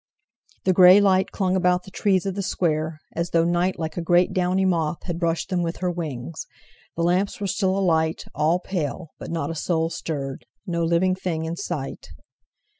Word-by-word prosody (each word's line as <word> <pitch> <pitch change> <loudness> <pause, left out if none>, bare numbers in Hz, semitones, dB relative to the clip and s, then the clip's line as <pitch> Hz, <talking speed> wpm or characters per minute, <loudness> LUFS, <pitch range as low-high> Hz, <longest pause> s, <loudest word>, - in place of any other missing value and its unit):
The 185 - +4
grey 185 +2 +8
light 190 -2 +3
clung 190 -2 0
about 180 -1 +2
the 190 - -13
trees 190 -2 +1
of 195 - -1
the 200 - -3
square, 160 -4 -1 0.2
as 170 +1 -1
though 165 -1 +3
Night, 175 +2 +1
like 160 -1 -4
a - - 0
great 175 +2 +3
downy 185 0 +1
moth, 170 -3 0
had 170 -2 -4
brushed 170 0 -1
them 180 -2 0
with 170 0 -2
her 180 -1 -1
wings. 160 -3 -5 0.5
The 170 - -1
lamps 180 +4 +1
were 205 - -3
still 190 0 0
alight, 160 -4 +1
all 155 +4 +2
pale, 175 -3 -4
but - - -7
not 165 0 -2
a - - -5
soul 165 0 0
stirred—no 165 - -4
living 170 +3 +2
thing 180 -4 -3
in 165 +1 -3
sight. 155 -5 -5
175 Hz, 190 wpm, -24 LUFS, 165-185 Hz, 0.5 s, grey